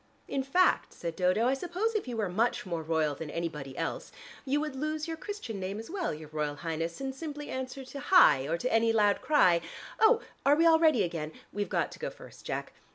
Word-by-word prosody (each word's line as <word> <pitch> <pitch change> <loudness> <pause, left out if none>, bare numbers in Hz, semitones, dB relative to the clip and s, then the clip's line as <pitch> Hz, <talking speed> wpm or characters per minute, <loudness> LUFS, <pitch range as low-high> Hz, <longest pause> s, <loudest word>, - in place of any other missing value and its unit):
"In 275 - -1
fact," 315 +8 +2
said 170 -1 -5
Dodo, 185 +6 +2
"I 255 - +3
suppose 360 +10 -2
if 430 -9 -2
you 240 -2 -4
were 215 -3 0
much 220 +7 0
more 170 -3 -3
royal 160 -2 0
than 150 +2 -7
anybody 150 -5 -5
else, - - -3 0.3
you 280 +2 +1
would 300 -2 -3
lose 305 +3 -2
your 325 - -3
Christian 320 - -6
name 190 +2 -4
as 225 +7 -8
well, 370 -3 -1
your 155 0 -8
Royal 150 -1 -2
Highness, 165 +2 -4
and 270 0 -3
simply 295 +1 -6
answer 260 +1 -5
to 260 +2 -8
Hie! 150 - +6
or 165 - 0
to 250 +9 -2
any 225 0 +4
loud 210 -2 +3
cry 180 - +4 0.4
Oh, 450 +1 +6 0.2
are 285 +1 +5
we 330 +2 +3
all 325 -1 +6
ready 310 -10 +4
again? 165 -3 -3 0.2
We've 205 0 -2
got - - 0
to - - -11
go - - -3
first, - - -13
Jack. - - -4
230 Hz, 220 wpm, -30 LUFS, -, 0.4 s, Hie